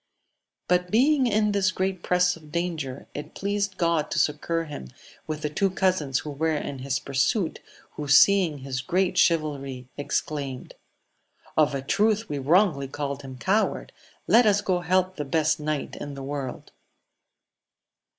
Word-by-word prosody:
But 180 Hz, 0 st, +2 dB
being 260 Hz, +5 st, +3 dB
in 210 Hz, -1 st, +2 dB
this 200 Hz, -2 st, +2 dB
great 185 Hz, -1 st, -2 dB
press 180 Hz, 0 st, +2 dB
of 155 Hz, -2 st, -15 dB
danger, 155 Hz, -6 st, -3 dB
it 145 Hz, -, -7 dB
pleased 200 Hz, -1 st, -2 dB
God 170 Hz, -3 st, +1 dB
to -, -, -3 dB
succour 165 Hz, +3 st, 0 dB
him 145 Hz, -, -8 dB, 0.4 s
with 155 Hz, -1 st, -4 dB
the 150 Hz, -, 0 dB
two 195 Hz, +6 st, +1 dB
cousins 180 Hz, -8 st, 0 dB
who 150 Hz, -, -4 dB
were 160 Hz, +2 st, 0 dB
in 140 Hz, -2 st, -5 dB
lus 135 Hz, 0 st, 0 dB
pursuit, 160 Hz, -, 0 dB, 0.3 s
who 150 Hz, -, -6 dB
seeing 165 Hz, +3 st, +5 dB
his 130 Hz, -2 st, -3 dB
great 180 Hz, +5 st, 0 dB
chivalry, 140 Hz, -6 st, 0 dB
exclaimed. 140 Hz, -2 st, -3 dB, 0.8 s
Of 150 Hz, -2 st, +3 dB
a 135 Hz, -, -3 dB
truth 215 Hz, +8 st, +1 dB
we 145 Hz, -, -2 dB
wrongly 150 Hz, -1 st, +3 dB
called 140 Hz, 0 st, -4 dB
him 130 Hz, -2 st, -9 dB
coward: 200 Hz, +10 st, 0 dB, 0.3 s
let 235 Hz, 0 st, +5 dB
us 205 Hz, -1 st, +4 dB
go 185 Hz, -3 st, 0 dB
help 185 Hz, +1 st, +1 dB
the 150 Hz, -, -2 dB
best 155 Hz, +2 st, +1 dB
knight 150 Hz, -1 st, -3 dB
in 145 Hz, -1 st, -6 dB
the 135 Hz, -, -7 dB
world 135 Hz, -2 st, -5 dB
155 Hz, 155 wpm, -25 LUFS, 140-185 Hz, 0.8 s, seeing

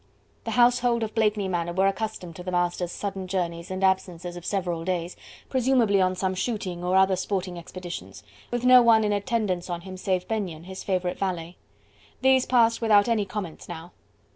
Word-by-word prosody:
The -, -, -3 dB
household 240 Hz, -1 st, +4 dB
of 215 Hz, -1 st, -4 dB
Blakeney 210 Hz, -3 st, +1 dB
Manor 175 Hz, -2 st, -2 dB
were 190 Hz, +2 st, +2 dB
accustomed 195 Hz, -4 st, -2 dB
to -, -, -7 dB
the 180 Hz, -, -5 dB
master's 175 Hz, 0 st, 0 dB
sudden 195 Hz, -1 st, -4 dB
journeys 170 Hz, -3 st, -3 dB
and 185 Hz, +1 st, -4 dB
absences 180 Hz, -2 st, 0 dB
of 175 Hz, 0 st, -8 dB
several 175 Hz, -4 st, -1 dB
days, 175 Hz, -1 st, -2 dB, 0.3 s
presumably 245 Hz, -6 st, +2 dB
on 185 Hz, 0 st, +2 dB
some 190 Hz, 0 st, -1 dB
shooting 185 Hz, -3 st, -3 dB
or 180 Hz, +1 st, +1 dB
other 190 Hz, 0 st, +5 dB
sporting 185 Hz, -1 st, -3 dB
expeditions, 165 Hz, -, -8 dB, 0.3 s
with 240 Hz, 0 st, -2 dB
no 250 Hz, 0 st, +8 dB
one 225 Hz, -2 st, +5 dB
in 210 Hz, -1 st, +1 dB
attendance 205 Hz, -4 st, -1 dB
on 175 Hz, -1 st, -3 dB
him, 185 Hz, +1 st, -9 dB
save 185 Hz, -1 st, -1 dB
Benyon, 190 Hz, -8 st, -3 dB
his 190 Hz, +1 st, -8 dB
favourite 180 Hz, -2 st, -1 dB
valet. 175 Hz, -3 st, -3 dB, 0.7 s
These 265 Hz, -1 st, +4 dB
passed 230 Hz, -2 st, +3 dB
without 210 Hz, -2 st, +5 dB
any 225 Hz, -3 st, +1 dB
comments 190 Hz, -7 st, -6 dB
now! 170 Hz, 0 st, -8 dB
190 Hz, 180 wpm, -26 LUFS, 175-215 Hz, 0.7 s, no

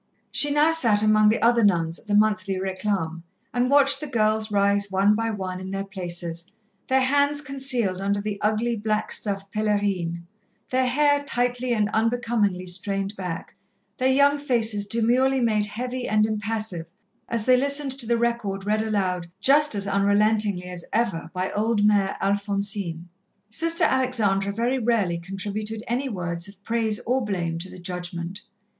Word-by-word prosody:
She 290 Hz, -, +3 dB
now 295 Hz, +2 st, +3 dB
sat 230 Hz, -10 st, +3 dB
among 215 Hz, 0 st, +5 dB
the 220 Hz, -, +1 dB
other 235 Hz, 0 st, +4 dB
nuns 170 Hz, -4 st, +2 dB
at -, -, -21 dB
the 205 Hz, -, +1 dB
monthly 210 Hz, -2 st, +2 dB
réclame 185 Hz, -3 st, -2 dB, 0.3 s
and 245 Hz, 0 st, +1 dB
watched 280 Hz, 0 st, +4 dB
the 300 Hz, -, -5 dB
girls 215 Hz, -3 st, +1 dB
rise 200 Hz, 0 st, +2 dB
one 195 Hz, +2 st, +3 dB
by 225 Hz, +1 st, -1 dB
one 190 Hz, -4 st, -4 dB
in 185 Hz, 0 st, -7 dB
their 195 Hz, 0 st, -3 dB
places, 175 Hz, -2 st, -5 dB, 0.4 s
their 265 Hz, 0 st, +3 dB
hands 285 Hz, +2 st, +2 dB
concealed 260 Hz, -9 st, -1 dB
under 200 Hz, +1 st, 0 dB
the 205 Hz, 0 st, -4 dB
ugly 220 Hz, +3 st, 0 dB
black 215 Hz, 0 st, -2 dB
stuff 195 Hz, -1 st, -2 dB
pèlerine, 200 Hz, -5 st, -1 dB, 0.5 s
their 255 Hz, 0 st, +2 dB
hair 285 Hz, +2 st, +2 dB
tightly 245 Hz, -2 st, -1 dB
and 215 Hz, -3 st, +2 dB
unbecomingly 220 Hz, -5 st, 0 dB
strained 195 Hz, +2 st, -2 dB
back, 180 Hz, -4 st, -6 dB, 0.5 s
their 260 Hz, +1 st, +3 dB
young 285 Hz, +2 st, +4 dB
faces 225 Hz, -7 st, 0 dB
demurely 250 Hz, +4 st, +2 dB
made 215 Hz, -4 st, +1 dB
heavy 250 Hz, +3 st, -4 dB
and 215 Hz, 0 st, +3 dB
impassive, 215 Hz, -5 st, -3 dB, 0.4 s
as 230 Hz, -2 st, -2 dB
they 255 Hz, -, +6 dB
listened 280 Hz, +2 st, 0 dB
to 235 Hz, -, -6 dB
the 235 Hz, 0 st, +2 dB
record 230 Hz, -5 st, -1 dB
read 215 Hz, +1 st, +1 dB
aloud 185 Hz, -5 st, -1 dB
just 290 Hz, +3 st, +4 dB
as 200 Hz, -1 st, 0 dB
unrelentingly 205 Hz, 0 st, +2 dB
as 180 Hz, -1 st, -7 dB
ever 200 Hz, -8 st, -1 dB
by 185 Hz, 0 st, -3 dB
old 215 Hz, 0 st, 0 dB
Mère 200 Hz, -2 st, +2 dB
Alphonsine. 200 Hz, -3 st, -1 dB, 0.4 s
Sister 330 Hz, +7 st, +2 dB
Alexandra 215 Hz, -7 st, +2 dB
very 240 Hz, +5 st, 0 dB
rarely 215 Hz, -8 st, +1 dB
contributed 205 Hz, +4 st, -4 dB
any 255 Hz, +4 st, -1 dB
words 175 Hz, -3 st, -3 dB
of 200 Hz, 0 st, -14 dB
praise 225 Hz, -2 st, -1 dB
or 255 Hz, +2 st, 0 dB
blame 170 Hz, -5 st, -2 dB
to 185 Hz, +2 st, -4 dB
the -, -, -11 dB
judgment. 180 Hz, +1 st, -6 dB
210 Hz, 160 wpm, -24 LUFS, 195-240 Hz, 0.5 s, they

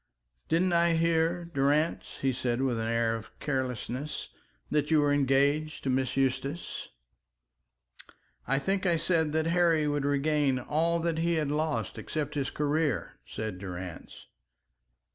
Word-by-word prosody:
"Didn't 175 Hz, +3 st, +2 dB
I 170 Hz, 0 st, +4 dB
hear, 165 Hz, +1 st, +1 dB
Durrance," 150 Hz, 0 st, 0 dB
he 135 Hz, -1 st, +2 dB
said 125 Hz, -1 st, -1 dB
with 125 Hz, -4 st, 0 dB
an 115 Hz, -, -2 dB
air 115 Hz, 0 st, +1 dB
of 110 Hz, -1 st, -10 dB
carelessness, 130 Hz, +1 st, -3 dB, 0.4 s
"that 150 Hz, -1 st, +1 dB
you 160 Hz, -1 st, +5 dB
were 145 Hz, -1 st, +3 dB
engaged 145 Hz, +2 st, +2 dB
to 135 Hz, -, 0 dB
Miss 130 Hz, 0 st, 0 dB
Eustace?" 135 Hz, +4 st, -2 dB, 1.6 s
"I -, -, +2 dB
think 190 Hz, +6 st, 0 dB
I 170 Hz, -1 st, +3 dB
said 160 Hz, -2 st, +1 dB
that 160 Hz, 0 st, +1 dB
Harry 165 Hz, -2 st, +3 dB
would 145 Hz, -1 st, 0 dB
regain 145 Hz, -1 st, +2 dB
all 160 Hz, +6 st, +1 dB
that 165 Hz, -1 st, 0 dB
he 170 Hz, +1 st, +1 dB
had 150 Hz, -3 st, 0 dB
lost 155 Hz, +1 st, -1 dB
except 150 Hz, -1 st, -3 dB
his 140 Hz, -2 st, -1 dB
career," 150 Hz, -1 st, -1 dB
said 110 Hz, -4 st, -5 dB
Durrance. 90 Hz, -2 st, -8 dB
145 Hz, 145 wpm, -29 LUFS, 130-160 Hz, 1.6 s, you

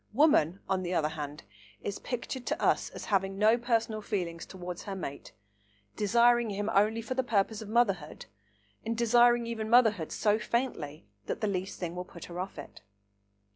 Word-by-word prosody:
Woman, 215 Hz, -, +4 dB
on 190 Hz, -1 st, 0 dB
the 180 Hz, 0 st, -2 dB
other 155 Hz, -2 st, +2 dB
hand, 150 Hz, -1 st, -6 dB, 0.4 s
is 200 Hz, -, -4 dB
pictured 250 Hz, +1 st, -5 dB
to -, -, -1 dB
us -, -, +2 dB
as -, -, -8 dB
having 195 Hz, 0 st, +1 dB
no 215 Hz, +3 st, +5 dB
personal 230 Hz, -2 st, 0 dB
feelings 175 Hz, -6 st, -3 dB
towards 180 Hz, -2 st, -7 dB
her 195 Hz, -, -4 dB
mate, 140 Hz, -7 st, -6 dB, 0.6 s
desiring 235 Hz, +2 st, +4 dB
him 205 Hz, +2 st, -2 dB
only 215 Hz, +3 st, +3 dB
for 255 Hz, -, -3 dB
the 260 Hz, -, +1 dB
purpose 220 Hz, -2 st, 0 dB
of 215 Hz, -, -8 dB
motherhood, 195 Hz, -9 st, 0 dB, 0.6 s
and 225 Hz, 0 st, -2 dB
desiring 240 Hz, 0 st, +4 dB
even 220 Hz, -2 st, -4 dB
motherhood 220 Hz, -9 st, +4 dB
so 210 Hz, 0 st, +2 dB
faintly 215 Hz, -, -2 dB, 0.2 s
that -, -, -3 dB
the 215 Hz, -, +1 dB
least 190 Hz, 0 st, -3 dB
thing 175 Hz, -1 st, -4 dB
will 180 Hz, -, -3 dB
put 175 Hz, -1 st, -11 dB
her 175 Hz, 0 st, -7 dB
off 185 Hz, -1 st, -5 dB
it. 145 Hz, -, -10 dB
210 Hz, 175 wpm, -30 LUFS, 180-235 Hz, 0.6 s, no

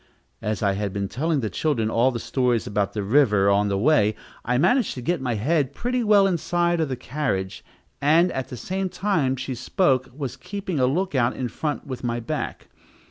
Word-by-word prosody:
As 105 Hz, 0 st, -2 dB
I 100 Hz, -, +3 dB
had 100 Hz, 0 st, -3 dB
been 100 Hz, -1 st, -2 dB
telling 150 Hz, -, -1 dB
the 110 Hz, -, -2 dB
children 115 Hz, -, 0 dB
all 120 Hz, +3 st, +3 dB
the 125 Hz, -, -3 dB
stories 125 Hz, -2 st, 0 dB
about 100 Hz, -1 st, -1 dB
the 105 Hz, -, -2 dB
river 105 Hz, -4 st, +4 dB
on 100 Hz, +1 st, +3 dB
the 100 Hz, -1 st, 0 dB
way, 110 Hz, -3 st, +3 dB, 0.3 s
I 125 Hz, +1 st, 0 dB
managed 245 Hz, -, +2 dB
to 125 Hz, -, -6 dB
get 170 Hz, +2 st, 0 dB
my 125 Hz, -3 st, -1 dB
head 140 Hz, +4 st, 0 dB
pretty 245 Hz, 0 st, -1 dB
well 205 Hz, -2 st, +5 dB
inside 175 Hz, -1 st, +1 dB
of 155 Hz, -, -1 dB
the 130 Hz, -, -2 dB
carriage, 125 Hz, -7 st, -3 dB, 0.4 s
and, 165 Hz, +5 st, +4 dB
at 130 Hz, -1 st, -3 dB
the 125 Hz, -, -7 dB, 0.3 s
time 165 Hz, -10 st, 0 dB
she 130 Hz, 0 st, -4 dB
spoke, 130 Hz, -, +1 dB
was 135 Hz, -1 st, -5 dB
keeping 185 Hz, 0 st, -4 dB
a 125 Hz, -, +3 dB
lookout 135 Hz, -5 st, +1 dB
in 125 Hz, -2 st, -3 dB
front 150 Hz, +4 st, -3 dB
with 130 Hz, -3 st, -6 dB
my 120 Hz, -1 st, -1 dB
back. 115 Hz, -, -5 dB
130 Hz, 195 wpm, -24 LUFS, 115-160 Hz, 0.4 s, well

